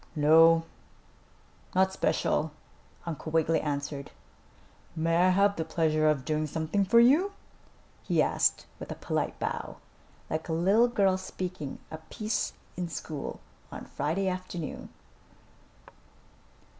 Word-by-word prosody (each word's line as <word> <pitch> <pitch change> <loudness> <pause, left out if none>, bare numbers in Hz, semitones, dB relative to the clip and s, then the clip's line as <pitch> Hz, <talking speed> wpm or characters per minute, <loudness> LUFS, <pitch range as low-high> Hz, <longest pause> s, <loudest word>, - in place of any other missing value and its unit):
"No, 165 +2 +6 1.1
not 190 0 +3
special," 155 -4 0 0.5
Uncle 160 -1 -5
Wiggily 160 0 +2
answered. 140 -1 -4 0.9
"May 165 +1 +1
I 180 +2 +5
have 200 +2 +3
the 160 - -2
pleasure 155 -1 +1
of 140 -4 0
doing 155 +1 0
something 160 +6 -1
for 235 +5 +5
you?" 305 +12 +5 0.7
he - - 0
asked - - +2
with - - -7
a - - -4
polite - - -2
bow, - - -4 0.5
like 160 +2 -4
a - - 0
little 195 +8 +4
girl 195 -5 +2
speaking 180 -6 -5
a 160 - -6
piece 215 +6 -3 0.2
in 180 -1 -3
school 150 -3 -6 0.3
on - - -8
Friday 165 +7 -2
afternoon. 185 -3 -5
165 Hz, 120 wpm, -29 LUFS, 155-190 Hz, 1.1 s, No